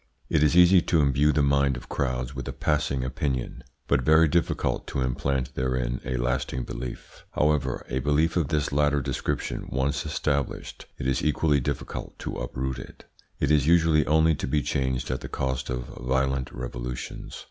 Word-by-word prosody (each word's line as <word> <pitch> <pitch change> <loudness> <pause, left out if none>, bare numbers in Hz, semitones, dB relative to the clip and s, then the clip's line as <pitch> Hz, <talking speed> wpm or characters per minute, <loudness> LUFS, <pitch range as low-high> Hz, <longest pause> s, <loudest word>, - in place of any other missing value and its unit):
It - - +2
is 75 +3 +4
easy 90 +1 +7
to 80 - +1
imbue 70 +1 +3
the 75 -1 +2
mind 70 -1 +2
of - - -10
crowds 65 -1 -2
with 65 -2 -6
a - - -2
passing 70 -3 0
opinion, 65 -3 -3 0.2
but 70 -2 +3
very 80 +5 +5
difficult 85 +2 0
to 70 - -2
implant 65 +1 -1
therein 65 -1 -1
a 65 0 -2
lasting 60 +1 -1
belief. - - -7
However, 75 -4 +1
a 65 - -1
belief 75 +4 +2
of 85 -5 +1
this 75 -2 0
latter 75 0 +2
description 65 -1 -3
once 70 +2 0
established, 75 -2 -2
it - - -5
is 65 0 0
equally 75 -1 +2
difficult 65 0 -4
to - - -5
uproot 65 0 -3
it. - - -11 0.4
It 70 - +1
is 75 -2 +3
usually 80 -2 +5
only 80 +1 +4
to 70 - -3
be 75 +2 +1
changed 65 -2 -1
at 65 - -3
the - - -7
cost 65 -1 -2
of 60 -1 -3
violent 65 +1 -1
revolutions. - - -6
70 Hz, 175 wpm, -26 LUFS, 65-75 Hz, 0.4 s, easy